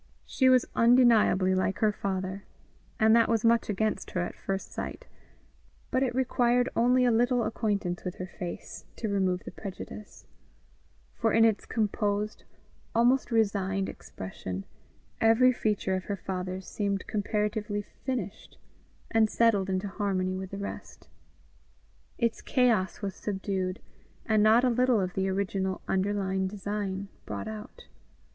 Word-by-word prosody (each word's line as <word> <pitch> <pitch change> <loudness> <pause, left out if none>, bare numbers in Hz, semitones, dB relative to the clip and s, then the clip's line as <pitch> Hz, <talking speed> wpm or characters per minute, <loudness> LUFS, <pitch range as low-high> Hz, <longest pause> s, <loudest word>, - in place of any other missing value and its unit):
She 260 -1 +3
was 255 -1 +5
undeniably 230 -6 +5
like 185 +1 0
her 215 -1 +3
father, 190 -1 -3 0.6
and 220 +1 +6
that 230 -1 +4
was 230 -1 +1
much 230 -1 +3
against 215 +1 -1
her 180 - -2
at 175 - -3
first 195 0 -4
sight; - - -6 0.9
but 255 - +2
it 250 -2 0
required 245 -1 +2
only 250 +2 +4
a 245 - +4
little 245 +1 +2
acquaintance 200 -6 -1
with 180 -1 -4
her 185 - -5
face 180 -1 -7
to 220 - -3
remove 190 -2 0
the - - -8
prejudice; 200 +1 -9 0.9
for 225 -1 0
in 225 0 +6
its 220 -2 +1
composed, 210 -1 -1 0.5
almost 245 +3 +3
resigned 195 -3 +1
expression, 95 0 -7 0.6
every 225 +3 +6
feature 210 -5 -1
of 185 - -4
her 200 - -3
father's 185 0 -4
seemed 200 -2 -2
comparatively 210 0 -1
finished, 250 -2 -6 0.5
and 220 -1 +4
settled 210 -5 +2
into 190 +1 -1
harmony 190 -2 -1
with 190 0 -5
the 200 - -6
rest; 200 0 -8 1.1
its 235 -2 0
chaos 220 -8 +1
was 195 -1 -2
subdued, 190 -1 -3 0.5
and 215 -2 +3
not 220 +3 +5
a 255 - +4
little 250 -1 +3
of 185 -2 -2
the 190 0 0
original 190 -1 -1
underlying 190 -1 0
design 200 0 -4 0.2
brought - - -4
out. 215 -1 -8
205 Hz, 140 wpm, -28 LUFS, 190-230 Hz, 1.1 s, and